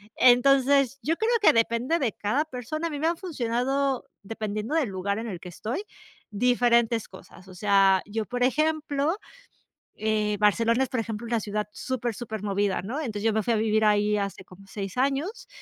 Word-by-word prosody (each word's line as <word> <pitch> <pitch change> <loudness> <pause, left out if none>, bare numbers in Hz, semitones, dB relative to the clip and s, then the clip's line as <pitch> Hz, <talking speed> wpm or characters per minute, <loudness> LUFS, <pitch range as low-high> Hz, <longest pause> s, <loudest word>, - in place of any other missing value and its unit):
Entonces, 270 +1 +4
yo 320 +3 0
creo 445 +2 +1
que - - +6
depende 235 +7 +1
de 245 -8 0
cada 255 +9 0
persona. 310 +4 -4
A - - -4
mí 295 -2 -5
me 315 - +1
ha 335 - +1
funcionado 270 -4 -1 0.2
dependiendo 215 +4 -4
del 305 -8 +1
lugar 200 +2 -2
en 230 - -5
el 185 -6 -5
que 180 - -9
estoy, 225 - -4 0.5
diferentes 235 0 +2
cosas, 185 0 -15
o 185 - -12
sea, 195 -1 +4
yo, 220 +1 -3
por 245 +3 -2
ejemplo, 305 +3 +1 0.8
eh, 215 -1 0
Barcelona 230 +4 +3
es, - - -7
por 255 - -3
ejemplo, 225 +1 -5
una 235 0 +1
ciudad 210 0 -3
súper, 240 0 -3
súper 220 -2 -6
movida, 200 -1 0
¿no?, 230 +10 -4
entonces, 220 -9 -4
yo 225 - +3
me 220 - +1
fui 235 - +1
a - - +2
vivir 220 0 +2
ahí 210 0 +3
hace 200 -1 -4
como 190 +2 -16
seis 195 0 -6
años. 280 - -1
230 Hz, 190 wpm, -26 LUFS, 210-270 Hz, 0.8 s, que